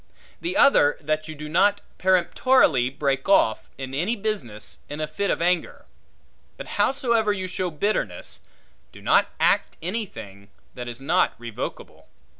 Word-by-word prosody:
The 345 +2 -3
other, 150 - +5
that 155 +1 -2
you 155 - -7
do 150 +1 -7
not 200 +6 +3 0.2
peremptorily 180 - +3
break 135 +3 -2
off, 110 - +3
in 135 -1 -6
any 180 - 0
business, 195 - -4
in 145 - -6
a 155 - 0
fit 190 +6 -3
of - - 0
anger; 180 0 0 0.7
but - - -7 0.2
howsoever 235 -5 +2
you 190 -2 -3
show 185 0 -2
bitterness, 200 +7 -2 0.5
do - - -13
not - - +3
act - - +2
anything, 110 - -6 0.2
that 125 -1 -7
is 120 +1 -7
not 135 - +2
revocable. 115 -1 -7
160 Hz, 145 wpm, -24 LUFS, 135-205 Hz, 0.7 s, other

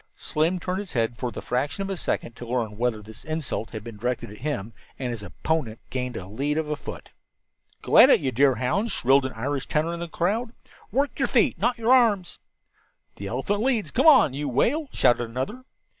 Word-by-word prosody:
Slim 160 +4 0
turned 180 +2 -2
his 200 -3 -7
head 115 -2 0
for 125 0 -3
the - - -7
fraction 140 +10 -1
of 195 - -5
a - - -1
second 120 -7 -3
to 120 - -8
learn 115 -3 -2
whether 115 -1 -1
this 110 0 -12
insult 155 -8 -3
had 110 -3 -7
been 115 -2 -9
directed 125 -1 -3
at 105 - -11
him, 115 -6 -3 0.2
and 125 -2 -3
his 115 -3 -5
opponent 120 0 -2
gained 125 -2 -3
a 90 - -6
lead 140 +10 -2
of 160 -1 -1
a - - 0
foot. - - -9 0.7
"Go - - +4
it, - - +8
you 130 - -1
deerhounds," 135 - +2
shrilled 135 +2 +3
an 130 - -9
Irish 135 +4 -3
tenor 155 +2 0
in 170 - -5
the 170 - -4
crowd. 220 +9 -1 0.4
"Work 280 +2 0
your - - +2
feet, - - +2
not 245 0 +1
your 230 +2 +3
arms." 215 -8 +3 0.8
"The 100 - -6
elephant 135 - -1
leads; 225 - 0
come 265 +6 +3
on, 265 - +7
you 145 +1 -3
whale!" 270 - +1
shouted 120 -1 +2
another. 135 - -4
140 Hz, 205 wpm, -25 LUFS, 120-190 Hz, 0.8 s, it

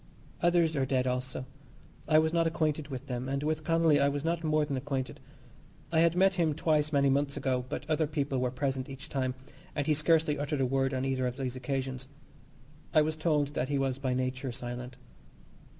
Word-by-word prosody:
Others 170 -2 +3
are 135 - +1
dead 130 -1 +1
also. 125 0 -2 0.6
I 155 0 +5
was 160 +1 +3
not 165 -1 +3
acquainted 155 -2 0
with 135 -2 -6
them, 125 -1 -4
and 140 +1 -1
with 155 0 -1
Connolly 165 -2 +3
I 140 0 +4
was 145 +1 -3
not 165 0 0
more 155 -1 +2
than 145 -2 -3
acquainted. 130 -2 -3 0.7
I 160 - +3
had 165 0 +4
met 190 +1 +4
him 155 -3 +2
twice 155 -1 +1
many 140 -2 +3
months 140 +1 +1
ago, 125 -2 0
but 145 - -5
other 155 0 +1
people 140 -3 -1
were 125 0 +1
present 130 0 -2
each 135 +3 -8
time, 130 -2 -1 0.4
and 145 - 0
he 155 - +3
scarcely 155 -1 +2
uttered 145 0 -1
a - - +3
word 135 +1 +1
on 130 +1 -1
either 130 -1 0
of 125 +1 -4
these 130 -2 -3
occasions. 130 -1 -3 0.9
I 155 - +7
was 155 +1 -1
told 155 -3 +1
that 140 -2 -2
he 145 - +1
was 135 -1 0
by 130 -2 0
nature 130 0 -2
silent. 125 0 -6
140 Hz, 205 wpm, -30 LUFS, 130-155 Hz, 0.9 s, I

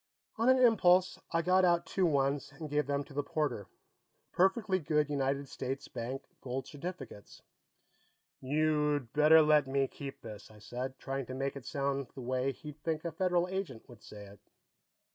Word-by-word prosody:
On 230 +3 +3
an 260 - +6
impulse, 185 -7 +4
I 165 0 +1
got 185 +1 +4
out 175 -1 +3
two 185 -2 +1
ones 140 -1 0
and 150 +1 -8
gave 150 -1 +1
them 140 0 0
to 140 - -15
the 145 - 0
porter 140 -9 -2 0.6
perfectly 190 +1 +2
good 150 -2 0
United 140 0 -1
States 135 +1 -5
Bank 125 +3 -5 0.2
gold 130 0 -4
certificates. 140 - -8 1.0
"You'd 150 -2 +1
better 155 +1 +7
let 150 -2 +4
me 135 0 +1
keep 135 +1 -8
this," 110 -2 -10
I 110 - -16
said, 125 +5 -6
trying 135 -2 -4
to 130 - -6
make 135 +1 -2
it 140 - -9
sound 140 -2 -1
the 135 - -7
way 130 +2 -1
he'd 150 +2 -11
think 160 0 -2
a 170 - -2
Federal 180 +1 +1
Agent 185 - -5
would 120 -3 -15
say 105 -1 -11
it. 100 0 -15
145 Hz, 175 wpm, -32 LUFS, 135-165 Hz, 1.0 s, better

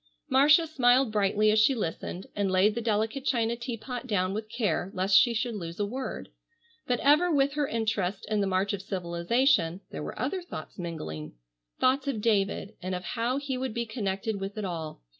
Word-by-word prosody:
Marcia 300 +5 +5
smiled 255 -5 +3
brightly 210 +1 +3
as 215 - +4
she 260 +5 +4
listened, 185 -2 -4
and 200 -1 0
laid 190 +3 +4
the 235 - -3
delicate 220 +4 0
china 235 -3 +1
teapot 240 +1 -6
down 190 -4 0
with 215 +1 -4
care 210 -6 -1
lest 190 +1 +2
she 240 +5 +7
should 235 +1 -1
lose 170 -4 -6
a 205 - +1
word. 255 +5 -5 0.6
But 245 -1 +1
ever 305 +5 +4
with 280 -2 +2
her 295 -1 0
interest 215 -5 -1
in 215 -1 0
the 200 - +1
march 195 +2 0
of 200 - -3
civilization, 180 - +1
there - - -5
were - - -6
other 380 - -1
thoughts 345 - -9
mingling. 80 - -6 0.5
Thoughts 265 +2 +2
of 265 -6 -1
David 205 -1 0
and 185 +1 -3
of 180 - -5
how 235 +6 -1
he 275 -2 -3
would 260 -4 -3
be 235 0 -1
connected 215 -2 -3
with 195 +2 -5
it 210 - -2
all. 160 - -5
215 Hz, 195 wpm, -28 LUFS, 190-255 Hz, 0.6 s, she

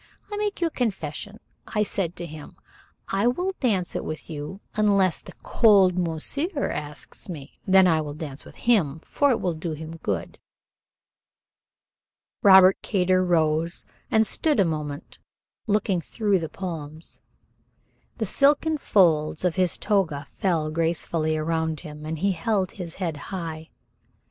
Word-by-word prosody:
"I 415 - -3
make 415 -3 -2
you - - +3
a 330 - -1
confession. 205 - -3 0.3
I 210 - +1
said 185 -4 -1
to 175 - -5
him, 155 -2 -10 0.5
'I 195 +4 +1
will 355 +10 0
dance 200 -9 0
it - - -2
with 155 +2 -6
you 150 +5 -6
unless 200 -4 +2
the - - -12
cold 200 -5 +5
monsieur 275 - -1
asks 150 +4 -6
me 145 -5 -9
then 190 0 +7
I 160 -3 +3
will 145 -1 -6
dance 150 -3 -7
with - - -14
him, 170 -11 +2
for 285 +9 +1
it 245 - +2
will 180 - -1
do 160 +1 -4
him 160 +2 -7
good.'" - - -4 2.0
Robert 190 -1 +7
Kater 185 -2 +2
rose 165 -1 +1 0.2
and 220 0 +4
stood 300 +2 +1
a 195 - +5
moment 150 -2 -5 0.5
looking 205 -4 +1
through 205 +2 0
the 160 -2 -4
palms. 160 -3 -7 1.0
The 220 - -1
silken 295 +7 +2
folds 160 - +3
of 180 - +2
his 185 -2 +2
toga 165 -9 0
fell 165 -5 0
gracefully 160 -1 0
around 160 0 -1
him, 150 0 -9
and 160 +1 -3
he 195 +5 +1
held 190 +2 0
his 175 -4 -8
head 170 -5 -3
high. 165 -4 -5
175 Hz, 150 wpm, -25 LUFS, 155-205 Hz, 2.0 s, then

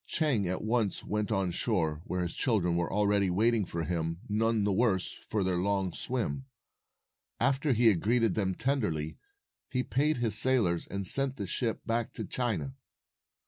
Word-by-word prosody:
Chang 135 - +1
at 90 +1 -2
once 110 -2 0
went 105 +1 -2
on 95 -4 0
shore, 80 -2 0
where 90 0 -2
his 85 - -4
children 95 -8 +1
were 85 -1 -1
already 100 -1 +2
waiting 110 +3 +2
for 85 -1 -4
him, 85 0 -2
none 110 +1 +1
the 100 -1 +1
worse 95 -3 +1
for 105 -2 -3
their 90 -1 0
long 95 -1 0
swim. 130 +2 -3 0.9
After 135 +3 +1
he 120 0 +2
had 105 -7 +5
greeted 115 -1 +2
them 95 -3 -1
tenderly, 95 - -1 0.5
he 125 -1 -1
paid 150 +4 +1
his 115 -3 +1
sailors 110 -7 +4
and 100 0 -4
sent 135 +6 +3
the 100 - -3
ship 115 +5 -2
back 115 0 -1
to 110 - -5
China. 95 - -2
105 Hz, 170 wpm, -30 LUFS, 90-120 Hz, 0.9 s, had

